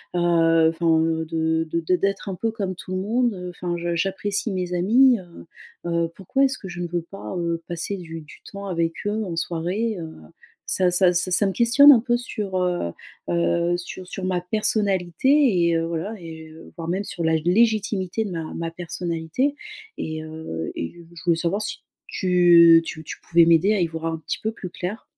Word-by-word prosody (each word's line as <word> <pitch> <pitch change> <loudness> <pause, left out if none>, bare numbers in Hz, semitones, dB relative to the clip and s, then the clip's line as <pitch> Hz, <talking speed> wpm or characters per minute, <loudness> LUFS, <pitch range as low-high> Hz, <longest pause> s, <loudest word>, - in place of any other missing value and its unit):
heu - - +1
heu, 165 -1 +4 0.3
enfin - - +3
de 160 0 0
de 170 +2 +1
d'être 200 0 -1
un 185 - -3
peu 225 +5 -1
comme 195 -4 -3
tout 185 - -10
le 185 - -1
monde, 235 +4 +1
heu, 180 0 -6
enfin 175 -1 -4
je 170 0 -2
j'apprécie 195 +4 -1
mes 180 -1 -3
amis, 235 +7 +4
heu 175 -2 -13 0.4
heu. 170 0 +1
Pourquoi 235 +9 0
est-ce 265 - -1
que 190 - -9
je 175 0 -6
ne 175 - -2
veux 170 -1 -2
pas, 195 +1 -8
heu, 170 -1 -2
passer 175 +4 -3
du 165 -2 -8
du 150 - -15
temps 200 0 -7
avec 165 -2 -1
eux 215 +1 -1
en 170 -3 -4
soirée? 180 +7 -2
Heu 160 -1 -7 0.5
ça 185 -1 +2
ça 180 0 +4
c 175 +2 0
ça 200 +3 +3
me - - 0
questionne 260 +5 +7
un 245 - +7
peu 240 -1 +1
sur, 210 -6 -4
heu 180 - -1 0.4
heu, 85 - +1
sur 180 +1 -8
sur 185 0 -5
ma 180 -1 0
personnalité 195 +1 0 0.4
et 170 - +2
heu, 165 - -1
voilà, 170 +6 -4
et 160 -1 -10 0.2
voire 165 -2 -6
même, 190 +3 -1
sur 175 -4 -4
la 160 0 +2
légitimité 205 +3 +1
de 195 - -5
ma 165 -2 -5
ma 165 0 -4
personnalité. 170 - -2 0.5
Et 155 0 -4
heu, 155 - -6
et 85 - -5 0.2
je 160 - -11
voulais 170 -2 +2
savoir 180 +5 -1
si - - -4 0.3
tu 175 -3 +6
tu 160 - -7
tu - - -7
pouvais 170 -1 +4
m'aider 170 +5 +4
à 205 - +1
y - - +3
voir 165 0 -5
un 165 0 -2
petit 155 - -4
peu 220 - -1
plus 185 -5 -8
clair? 190 +5 -5
175 Hz, 205 wpm, -23 LUFS, 165-200 Hz, 0.5 s, questionne